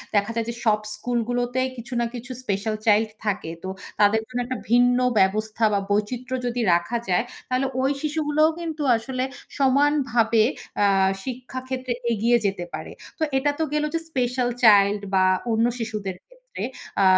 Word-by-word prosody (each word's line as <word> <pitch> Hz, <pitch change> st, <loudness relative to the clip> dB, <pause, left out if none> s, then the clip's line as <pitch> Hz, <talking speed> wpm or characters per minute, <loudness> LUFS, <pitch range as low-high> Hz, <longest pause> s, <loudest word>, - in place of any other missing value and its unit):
দেখা 205 Hz, +2 st, +2 dB
যায় 230 Hz, -1 st, 0 dB
যে, -, -, -2 dB
সব 210 Hz, -1 st, +4 dB, 0.2 s
স্কুলগুলোতে 245 Hz, +1 st, -1 dB, 0.2 s
কিছু 240 Hz, +2 st, -8 dB
না 235 Hz, -, +1 dB
কিছু 250 Hz, +2 st, -7 dB
স্পেশাল 210 Hz, 0 st, -1 dB
চাইল্ড 215 Hz, 0 st, +4 dB, 0.2 s
থাকে, 200 Hz, -5 st, -1 dB
তো 190 Hz, -, -4 dB, 0.3 s
তাদের 210 Hz, +2 st, +4 dB
জন্য 250 Hz, -1 st, -4 dB
একটা 255 Hz, 0 st, -3 dB
ভিন্ন 245 Hz, +1 st, +5 dB, 0.2 s
ব্যবস্থা 215 Hz, +3 st, +1 dB
বা 200 Hz, -, +3 dB
বৈচিত্র্য 245 Hz, +5 st, -1 dB
যদি 245 Hz, 0 st, -1 dB
রাখা 175 Hz, +8 st, +1 dB
যায় 180 Hz, +5 st, +3 dB, 0.3 s
তাহলে 255 Hz, +1 st, +1 dB
ওই 270 Hz, +2 st, +2 dB
শিশুগুলোও 305 Hz, 0 st, +2 dB
কিন্তু 320 Hz, -3 st, -4 dB, 0.2 s
আসলে 255 Hz, +2 st, -3 dB, 0.3 s
সমানভাবে 260 Hz, -5 st, +3 dB, 0.4 s
আ -, -, +5 dB, 0.4 s
শিক্ষা 255 Hz, 0 st, -5 dB
ক্ষেত্রে 255 Hz, -1 st, -2 dB, 0.2 s
এগিয়ে 235 Hz, +3 st, +3 dB
যেতে 190 Hz, -3 st, -1 dB
পারে। -, -, -6 dB, 0.3 s
তো -, -, +1 dB
এটা 290 Hz, +2 st, +2 dB
তো -, -, +2 dB
গেলো 300 Hz, 0 st, +1 dB
যে 330 Hz, -, +1 dB
স্পেশাল 250 Hz, -3 st, 0 dB
চাইল্ড 205 Hz, -1 st, +6 dB
বা 190 Hz, 0 st, +4 dB, 0.3 s
অন্য 225 Hz, +1 st, +3 dB
শিশুদের 210 Hz, -4 st, -4 dB
ক্ষেত্রে। -, -, -10 dB, 0.4 s
আ -, -, +5 dB
240 Hz, 160 wpm, -24 LUFS, 215-260 Hz, 0.4 s, চাইল্ড